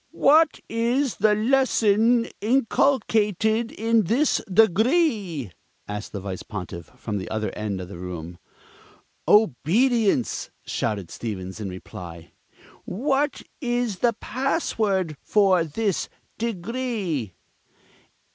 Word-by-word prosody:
"What 310 +2 +5
is 235 -1 0
the 210 -1 +4
lesson 230 -1 +3 0.2
inculcated 225 -2 +2
in 225 -1 +1
this 260 - +2
Degree?" 215 - +2 0.4
asked 105 +1 -5
the 100 - -5
Vice 95 -1 -5
Pontiff 90 -5 -7
from 105 -3 -3
the 95 - -6
other 110 -1 -2
end 105 -3 -4
of 90 - -6
the 90 -2 -9
room. 85 -1 -7 0.9
"Obedience!" 210 - +3 0.2
shouted 100 -6 -2
Stevens 95 -3 -5
in 100 -3 -4
reply. 85 -2 -9 0.5
"What 275 +7 -1 0.2
is 240 -5 -1
the 235 -1 +3
password 215 - -1 0.2
of 185 -7 +4
this 210 -3 -1 0.3
Degree?" 215 - -3
210 Hz, 100 wpm, -24 LUFS, -, 0.9 s, What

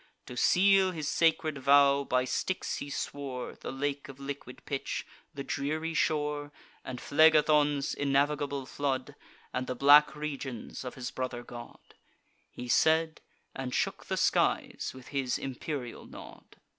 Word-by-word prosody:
To 125 - -9
seal 195 +6 +4
his 155 -5 -4
sacred 160 -3 +1
vow, 140 +1 +5
by 125 -1 +1
Styx 185 +8 -2
he 145 - -6
swore, 135 -2 -5
The - - -7
lake 140 +1 -3
of 135 0 -11
liquid 140 -2 -8
pitch, 140 -2 -3 0.3
the 140 - -6
dreary 155 +4 -2
shore, 150 -2 0 0.3
And 125 -1 -6
Phlegethon's 150 -2 +4
innavigable 140 0 0
flood, 135 -2 -2 0.4
And 125 0 -2
the 125 - -3
black 145 +4 +6
regions 140 -6 -5
of 125 - -6
his 125 -2 -5
brother 125 -2 -4
god. 120 -1 -11 0.6
He 125 - -8
said; 160 +5 +3 0.3
and 130 -2 -4
shook - - -1
the - - -1
skies - - +1
with 130 -1 -12
his 135 -3 -1
imperial 135 -1 -5
nod. - - -13
140 Hz, 140 wpm, -30 LUFS, 130-150 Hz, 0.6 s, black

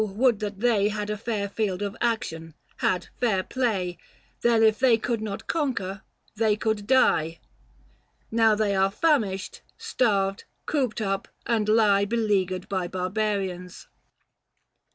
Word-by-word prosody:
would 215 +2 +1
that 205 -2 -5
they 215 -4 +3
435 210 0 -4
Had 210 0 -3
a 210 - -2
fair 215 -3 -2
field 200 -2 -2
of 200 +1 -4
action, 165 -10 -2 0.2
had 180 -1 0
fair 205 -6 +1
play! 195 -9 -1 0.4
Then, 230 -1 +3
if 220 -1 +4
they 255 -3 +5
could 230 0 -2
not 210 -2 -5
conquer, 225 - -2 0.3
they 215 -1 +2
could 215 -2 -2
die. 165 -10 +3 0.9
Now 225 -1 +4
are - - +2
they 200 -2 +2
famished, 205 -7 0 0.2
starved, 210 - 0 0.2
cooped 260 -7 -1
up, 195 -2 -2 0.2
and 220 -3 0
lie 210 -2 +4
Beleaguered 200 -4 0
by 185 -2 -2
barbarians." 185 -1 -3
210 Hz, 135 wpm, -25 LUFS, 195-230 Hz, 0.9 s, they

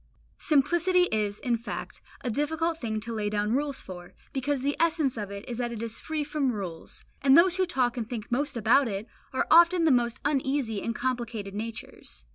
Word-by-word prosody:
Simplicity 345 +5 +3
is, 210 -1 -1
in 240 -2 0
fact, 230 - -7 0.2
a 245 - -2
difficult 320 +5 -1
thing 220 -3 -2
to 230 +1 -4
lay 210 -2 -1
down 210 +1 0
rules 280 +1 -1
for, 175 -1 -10 0.2
because 275 0 -1
the 285 +1 +1
essence 315 -5 +2
of 210 -3 -4
it 200 0 -8
is 240 -1 -5
that 240 -1 -1
it 230 -1 -5
is 230 -1 -1
free 310 -1 -2
from 290 -3 0
rules; 185 -7 -7 0.2
and 270 +1 +6
those 360 +1 +5
who 375 -1 +2
talk 255 -8 0
and 225 -2 -3
think 230 -3 -6
most 280 +1 0
about 235 +5 +4
it, 200 -1 -4 0.3
are 260 - 0
often 340 +1 +7
the 320 - +4
most 240 -2 +1
uneasy 270 -6 0
and 230 - -3
complicated 235 -5 -3
natures. 215 - -7
245 Hz, 200 wpm, -27 LUFS, 220-295 Hz, 0.3 s, often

